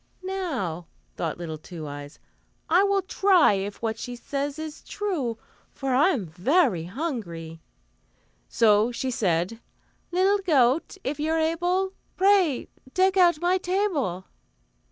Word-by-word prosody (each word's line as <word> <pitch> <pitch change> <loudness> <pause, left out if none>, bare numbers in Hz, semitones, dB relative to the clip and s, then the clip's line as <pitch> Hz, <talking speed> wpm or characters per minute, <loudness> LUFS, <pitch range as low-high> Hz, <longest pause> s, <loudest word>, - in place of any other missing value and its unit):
"Now," 265 - -3 0.3
thought 165 -2 -3
little 160 -3 -6
Two 160 -1 -8
Eyes, 145 0 -8 0.5
"I 350 +4 +5
will 400 -1 +2
try 375 - +4
if 200 +3 -4
what 225 0 -2
she 245 -1 -5
says 280 +4 -3
is 315 -1 -7
true, 315 - -3 0.4
for 270 -2 -2
I 285 +8 +5
am 255 - -1
very 185 - +1
hungry," 175 - -5 0.9
so 215 0 +4
she 255 +2 -3
said: 190 -2 0 0.5
"Little 380 +3 +3
goat, 300 -2 +2
if 290 +3 -3
you're 315 +2 0
able, 350 +4 0 0.2
Pray 375 -8 +3 0.3
deck 380 +1 +3
out 345 -4 +4
my 360 +2 +2
table." 355 - -1
275 Hz, 130 wpm, -25 LUFS, -, 0.9 s, I